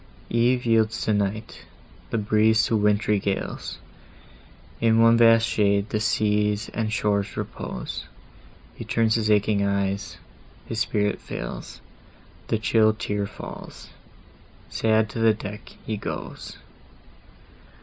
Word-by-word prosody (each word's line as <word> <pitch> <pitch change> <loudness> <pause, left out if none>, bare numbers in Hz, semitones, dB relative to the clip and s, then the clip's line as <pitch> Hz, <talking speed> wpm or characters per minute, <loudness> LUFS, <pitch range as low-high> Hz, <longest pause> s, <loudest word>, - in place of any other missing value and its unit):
Eve 120 +2 +2
yields 115 -1 +2
to 110 - +1
night, 105 +2 -2 0.5
the - - -1
breeze 110 +1 +3
to 115 - 0
wintry 105 0 +2
gales, 100 0 -3 1.0
In 115 -1 +3
one 115 0 +6
vast 115 -1 +6
shade 100 -2 +1
the 105 - 0
seas 105 -1 +1
and 110 -1 -2
shores 105 -3 0
repose; - - -5 0.7
He - - -8
turns 110 0 +1
his 110 -1 +1
aching 105 -1 +3
eyes,—his 100 +2 -4
spirit 105 -3 0
fails, - - -7 0.7
The 110 - +1
chill 110 0 +3
tear 105 -2 -2
falls;—sad 110 +1 -5
to - - -5
the 115 -1 +4
deck 105 0 -9
he 110 - -3
goes! - - -7
110 Hz, 115 wpm, -24 LUFS, 105-115 Hz, 1.0 s, one